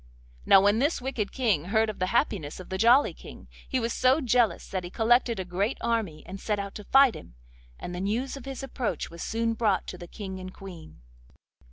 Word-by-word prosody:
Now 195 - +8
when 205 +3 +3
this 290 +6 +1
wicked 245 -6 -3
King 210 - 0
heard 220 +3 +2
of 215 - -6
the 185 - 0
happiness 190 - -1
of 185 - -10
the 190 - -4
Jolly 245 +5 +5
King, - - -13 0.2
he 260 - +1
was 230 -1 -2
so 260 +4 +3
jealous 245 -4 +1
that 185 -2 -3
he 175 - -6
collected 235 +1 +2
a 190 - -3
great 195 +7 -1
army 225 -9 -2
and 195 +2 -8
set 210 +1 -1
out 200 0 -5
to 210 - -8
fight 270 0 +6
him, - - -12 0.4
and 175 - -7
the 180 - -4
news 230 +8 -2
of 275 - -10
his 270 -1 -6
approach 260 -8 -3
was 170 0 -9
soon 230 0 -1
brought 215 -4 +1
to 180 - -8
the 175 - -9
King 190 -1 -7
and 185 0 -9
Queen. 175 - -11
215 Hz, 220 wpm, -27 LUFS, 190-240 Hz, 0.4 s, Now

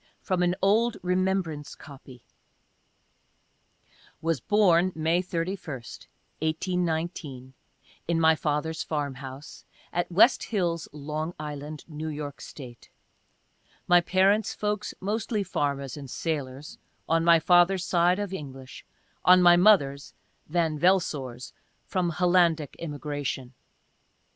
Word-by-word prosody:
From 185 -2 -1
an 175 0 +2
old 220 +4 +3
"remembrance 180 -5 -1
copy." 130 -4 -14 2.0
Was 165 -2 -1
born 185 - +3
May 165 +2 +1
31, 170 -7 -4 0.6
18 170 +3 -1
1 160 0 0 0.2
9, 130 -2 -10 0.5
in 170 0 +1
my 160 0 +5
father's 155 +1 -2
farm 145 -3 -2
house, 135 +2 -10 0.3
at 175 +1 -1
West 210 +9 +5
Hills, 175 -6 -1
L. 155 +3 -5
I., 150 0 -6
New 155 -1 -6
York 145 -2 -6
State. 125 -5 -11 1.0
My 175 0 +6
parents' 195 +4 +2
folks 210 0 -3
mostly 215 +2 -1
farmers 140 -7 -2
and 140 -3 -9
sailors 145 -2 -4
— - - -43
on 165 0 +2
my 170 -1 +6
father's 175 +2 +4
side, 175 +1 +3
of 205 -2 -4
English 135 -6 -8 0.2
— - - -40
on 185 - +8
my 175 0 +8
mother's, 160 -8 +3 0.3
(Van 160 -2 0
Velsor's,) 145 -9 0 0.3
from 180 -2 -1
Hollandic 170 -3 +2
immigration. 145 -4 -4
165 Hz, 120 wpm, -27 LUFS, 145-180 Hz, 2.0 s, on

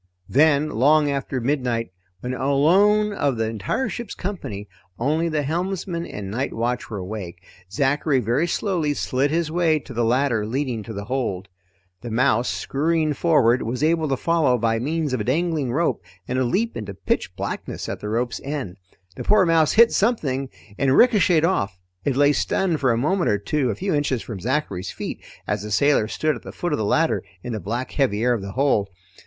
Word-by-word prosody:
Then, 150 +2 +3
long 145 +5 +3
after 135 -1 -2
midnight 120 -5 -1 0.3
when, 125 +1 -3
alone 185 +11 +3
of 140 - 0
the 110 0 0
entire 110 - -2
ship's 240 -2 -6
company, 135 - -5 0.3
only 155 +7 0
the 155 -2 0
helmsman 170 +2 -2
and 100 -2 -6
night 130 +6 -2
watch 120 +2 -2
were 105 - -5
awake, 90 -2 -6 0.3
Zachary 140 +4 +1
very 125 +8 +1
slowly 170 -5 0
slid 135 +2 0
his 160 0 0
way 165 -2 +2
to 140 -3 -9
the 120 0 0
ladder 120 -1 +2
leading 125 +1 -2
to 110 +2 -8
the 100 0 -5
hold. 105 -7 -3 0.5
The 120 - -6
mouse, 120 +1 +2
scurrying 155 +2 0
forward, 130 -6 +3
was 120 +5 -3
able 160 0 +2
to 135 - 0
follow 160 -6 +2
by 115 0 +1
means 150 +2 -1
of 125 - 0
a - - -1
dangling 150 +1 0
rope 150 - 0 0.2
and 130 +1 -1
a - - +2
leap 220 - 0
into 100 -3 -6
pitch - - -2
blackness - - -5
at - - -4
the 105 - -5
rope's 120 +2 -1
end. 135 -10 -4 0.4
The - - -6
poor 210 -3 +4
mouse 165 -2 +3
hit 230 +1 +6
something 140 - 0 0.3
and 135 -1 +3
ricocheted 185 -9 +5
off. 100 - 0 0.3
It 140 - +1
lay 145 +1 +4
stunned 170 +1 0
for 130 -3 +2
a 115 - +1
moment 175 +9 +1
or 105 - +2
two 130 +6 -1
a 105 - -1
few 190 -1 -2
inches 145 -5 0
from 110 -5 -7
Zachary's 105 -6 -2
feet - - -6 0.2
as 105 -1 -1
the 105 - -6
sailor 125 +1 +3
stood 155 +6 0
at 120 - -9
the - - -9
foot 175 - -3
of - - 0
the 110 - 0
ladder 160 +10 +1 0.2
in 120 - -4
the 110 - -3
black 120 +6 -4
heavy 115 -6 0
air 125 0 +3
of 115 - -2
the 100 0 -7
hold. 120 -6 +1
135 Hz, 195 wpm, -23 LUFS, 115-160 Hz, 0.5 s, hit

